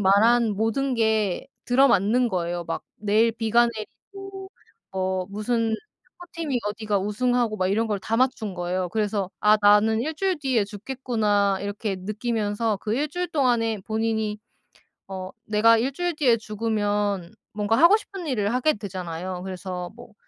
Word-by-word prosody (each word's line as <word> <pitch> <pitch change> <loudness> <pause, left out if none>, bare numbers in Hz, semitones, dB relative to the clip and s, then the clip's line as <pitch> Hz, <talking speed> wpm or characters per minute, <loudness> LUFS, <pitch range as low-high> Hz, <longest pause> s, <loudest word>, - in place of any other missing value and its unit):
말한 215 +3 +4
모든 250 +5 0
게 220 -4 +1 0.2
들어 270 +3 +5
맞는 235 +4 +3
거예요. 175 -2 -2
막 165 - -4
내일 215 +2 +2
비가 230 +1 +3
내리고 385 - -9 0.4
어 185 -1 -1
무슨 225 +2 -1 0.5
축구팀이 330 -7 -3
어디가 210 -1 -1
우승하고 225 +2 0
막 185 - +1
이런 220 +4 +1
걸 210 -2 -1
다 225 +3 -1
맞춘 230 -6 0
거예요. 180 +1 -2
그래서 205 -1 -1
'아 210 0 +5
나는 210 +2 +5
1 310 +6 -2
주일 370 0 0
뒤에 255 -7 +1
죽겠구나.' 210 -3 0
이렇게 205 0 -3
느끼면서 215 +1 -1
그 215 +2 -2
1 295 +4 0
주일 355 +4 -3
동안에 240 -8 +1
본인이 220 -1 -1 0.7
어 185 0 -6
내가 220 +2 +4
1 245 +5 0
주일 350 +3 -2
뒤에 250 -6 +3
죽으면 205 -4 -1 0.2
뭔가 210 +1 +1
하고 340 - +7
싶은 390 -5 -8
일을 220 -6 0
하게 255 +5 +2
되잖아요. 185 -3 -5
그래서 180 -1 -5
뭐 235 -2 -14
220 Hz, 300 characters per minute, -24 LUFS, 200-245 Hz, 0.7 s, 하고